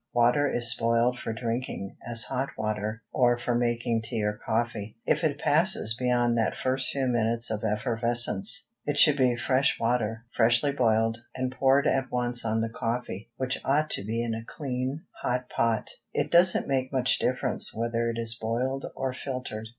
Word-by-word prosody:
Water 125 +4 +3
is 120 -1 +2
spoiled 115 +2 +1
for - - -4
drinking, 115 -3 -4
as 115 -1 +2
hot 135 +1 -2
water, 110 +1 -3
or 120 -1 +3
for 120 0 -2
making 120 -1 0
tea 110 -1 -3
or 105 0 0
coffee, 110 -2 -2
if - - +1
it 145 -3 +1
passes 155 - +3
beyond 120 0 +1
that 110 - 0
first 130 0 0
few 135 -1 -1
minutes 115 -2 0
of 110 0 -3
effervescence. 120 - +1 0.2
It 145 -1 -1
should 150 -1 +6
be 130 -3 +2
fresh 130 +3 +1
water, 115 -1 -1
freshly 120 +4 +3
boiled, 115 -3 +1 0.2
and 130 0 -2
poured 135 +2 +3
at 135 -2 +1
once 120 -1 -1
on 110 0 0
the 115 - -1
coffee, 115 -2 -4
which 130 0 -2
ought 150 +3 +1
to - - -1
be 115 +3 -2
in 115 -1 -2
a 110 0 -5
clean, 130 +3 -4 0.2
hot 125 +1 -2
pot. 115 -2 0 0.2
It - - -1
doesn't 175 +1 +5
make 130 -1 -1
much 130 -2 +2
difference 130 0 +1
whether 115 +1 -1
it 115 - -4
is 115 -1 0
boiled 120 +4 -2
or 130 -1 -2
filtered. 125 -5 -5
120 Hz, 175 wpm, -27 LUFS, 115-130 Hz, 0.2 s, should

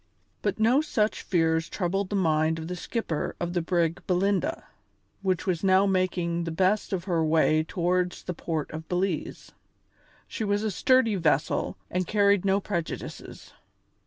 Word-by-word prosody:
But - - -1
no 240 +6 +4
such 220 -9 0
fears 165 -2 +1
troubled 195 +1 -1
the 205 - -2
mind 160 -3 +2
of 160 0 -6
the 180 - -4
skipper 175 -4 -3
of 175 0 -3
the 175 - +1
brig 170 +1 0
Belinda, 200 - 0 0.6
which 185 -3 0
was 180 -3 -1
now 190 0 +5
making 180 -3 0
the - - -2
best 190 +5 +1
of 185 -3 -2
her 170 -4 0
way 155 0 +3
towards 180 +2 -1
the 180 - -4
port 160 -2 -3
of 160 +1 -8
Belize. 180 -2 -2 0.8
She - - -4
was 205 0 0
a 215 - 0
sturdy 230 +2 +3
vessel 155 -4 0
and 180 -1 -1
carried 200 -2 +3
no 195 0 +3
prejudices. 175 -5 -6
180 Hz, 160 wpm, -27 LUFS, 165-200 Hz, 0.8 s, now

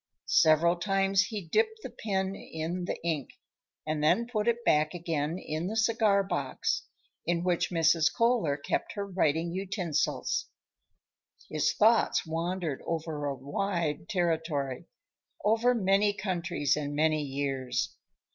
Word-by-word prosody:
Several 165 +2 +4
times 195 +1 +2
he 215 -2 -4
dipped 440 - +1
the - - -6
pen 190 -2 -2
in 170 0 -4
the - - -3
ink, 155 -6 -1 0.6
and 155 -1 -2
then 225 +10 +3
put 225 -2 -2
it 235 0 +1
back 155 +3 +3
again 165 -1 -2
in 160 -1 -4
the 215 - -3
cigar 220 -3 +3
box 195 - -2 0.4
in 170 0 +1
which 175 -1 +1
Mrs. 165 -2 +3
Kohler 230 -12 +2
kept 140 - -2
her 200 -1 -3
writing 170 -3 0
utensils. 190 - -1 1.0
His - - +1
thoughts 225 +1 +3
wandered 165 -2 -2
over 160 -3 -3
a 140 -1 -1
wide 155 +3 -2
territory; 160 -7 -1 0.6
over 230 +4 +3
many 200 -1 +3
countries 175 -7 -1
and 145 -1 -3
many 155 0 +2
years. 135 -2 -2
170 Hz, 130 wpm, -29 LUFS, 155-200 Hz, 1.0 s, Several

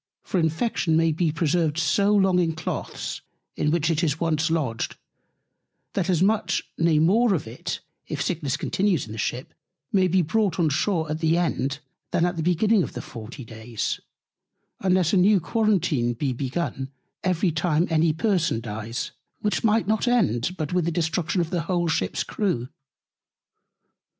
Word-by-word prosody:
For 185 - -1
Infection 160 0 +1
may 165 0 +3
be 160 +1 +1
preserved 160 0 +1
so 200 +5 +2
long 190 -2 +4
in 165 -2 +1
Cloaths, 160 - -4 0.3
in 150 - 0
which 165 +1 +2
it 165 +1 0
is 160 -1 0
once 160 -1 +1
lodged, 145 -9 -1 1.0
that 190 -2 -1
as 180 -1 +3
much, 215 +2 +1
nay 165 -1 +3
more 200 +7 +4
of 145 - -3
it, 160 +10 -5 0.3
if 155 - -4
Sickness 150 -4 -1
continues 190 -7 0
in 110 - -11
the 110 - -6
Ship, 125 +4 -3 0.4
maybe 185 -2 +3
brought 195 +1 0
on 165 -3 +3
Shoar 160 +1 0
at 155 - -2
the 160 +1 +2
End 145 -4 -1 0.3
than 175 -1 +2
at 175 +1 -1
the 165 - -2
beginning 190 +6 +3
of - - -3
the - - -5
40 120 +2 -9
Days: 110 0 -4 0.8
Unless 185 -2 +2
a - - +5
new 195 +2 +5
Quarentine 175 - +1
be 130 +2 -1
begun 135 +1 -3 0.3
every 185 -1 +1
time 160 +1 +1
any 160 0 +3
Person 165 - +1
dies; 110 +1 -5 0.3
which 210 - 0
might 225 0 +3
not 220 +3 +1
end, 180 - +2
but 155 0 -3
with 180 -2 +2
the 170 - 0
Destruction 170 +2 0
of 165 0 -3
the 175 -2 0
whole 175 +1 0
Ship's 95 - 0
Crew. 130 - -2
165 Hz, 165 wpm, -25 LUFS, 150-185 Hz, 1.0 s, a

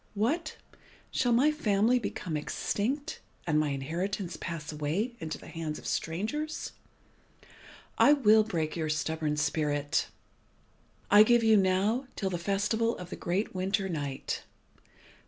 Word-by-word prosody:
What! 310 - -1 0.5
shall 245 - +1
my 260 +6 +5
family 230 -4 +2
become 180 -7 -4
extinct, 260 - -2 0.3
and 150 -2 +2
my 155 -1 +1
inheritance 170 +6 -3
pass 165 -3 -5
away 160 +11 -2
into 160 -1 -4
the - - -14
hands 160 -2 -5
of - - -12
strangers? 225 - -2 1.3
I 290 - +7
will 220 -6 +5
break 165 -8 -2
your 160 -2 -2
stubborn 155 0 -1
spirit. 145 -1 0 1.0
I 205 +1 +9
give 235 +2 +5
you 220 -1 +6
now 200 +6 +2
till 195 -2 -2
the 175 - -2
festival 215 +5 0
of 180 -1 -9
the - - -3
great 190 +5 -2
winter 190 +1 0
night. 145 -6 -3
190 Hz, 135 wpm, -29 LUFS, 160-225 Hz, 1.3 s, I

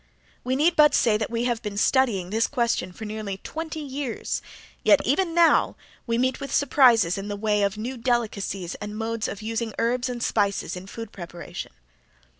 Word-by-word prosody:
We 255 +1 0
need 320 +5 +3
but 300 -3 +6
say 225 -3 +3
that 215 - -3
we 235 0 -1
have 240 -2 0
been 210 -2 -5
studying 210 -6 +2
this 225 +1 +2
question 235 -8 0
for 220 +5 -8
nearly 210 -2 -4
twenty 320 0 -5
years 275 -3 -3 0.4
yet - - +6
even 360 -3 +1
now 340 -1 +4 0.3
we 230 0 +1
meet 255 +2 +1
with 275 0 -6
surprises 240 -10 +4
in 195 - -6
the 205 - -3
way 210 0 +1
of 200 0 0
new 245 +4 -4
delicacies 215 -7 -1
and 210 +1 -5
modes 225 0 -2
of 205 +1 -6
using 225 0 -3
herbs 245 +2 0
and 240 -1 -4
spices 200 -3 0
in 180 +1 -8
food 225 +1 -8
preparation. 175 -2 -8
230 Hz, 185 wpm, -25 LUFS, 205-255 Hz, 0.4 s, but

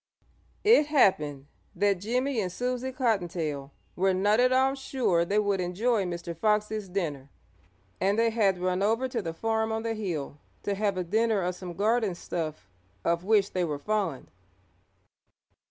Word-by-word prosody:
It 415 -9 +6
happened 150 - +2 0.3
that 200 0 +2
Jimmie 250 +4 0
and 185 -2 -3
Susie 250 +4 -2
Cottontail 175 - -1 0.2
were 190 +1 +2
not 205 +4 +3
at 250 +1 +4
all 265 +1 +3
sure 260 -10 0
they 200 +5 0
would 200 -2 +1
enjoy 200 +4 0
Mr. 170 -1 -5
Fox's 210 +1 0
dinner, 150 -8 -3 0.7
and 200 +2 +1
they 230 0 +3
had 205 -5 +2
run 180 +1 -1
over 225 +5 +1
to 245 -3 -3
the 165 -4 -4
farm 220 +2 0
on 220 0 -2
the 230 0 -1
hill 170 -9 -4 0.2
to 200 - -1
have 200 -1 0
a 180 - 0
dinner 215 +2 +1
of 180 +1 -1
some 180 -1 -8
garden 215 -1 +1
stuff 155 - -5 0.4
of 170 +1 +1
which 205 0 +3
they 185 - 0
were 150 -4 -2
fond. 190 -3 -2
200 Hz, 160 wpm, -28 LUFS, 175-225 Hz, 0.7 s, It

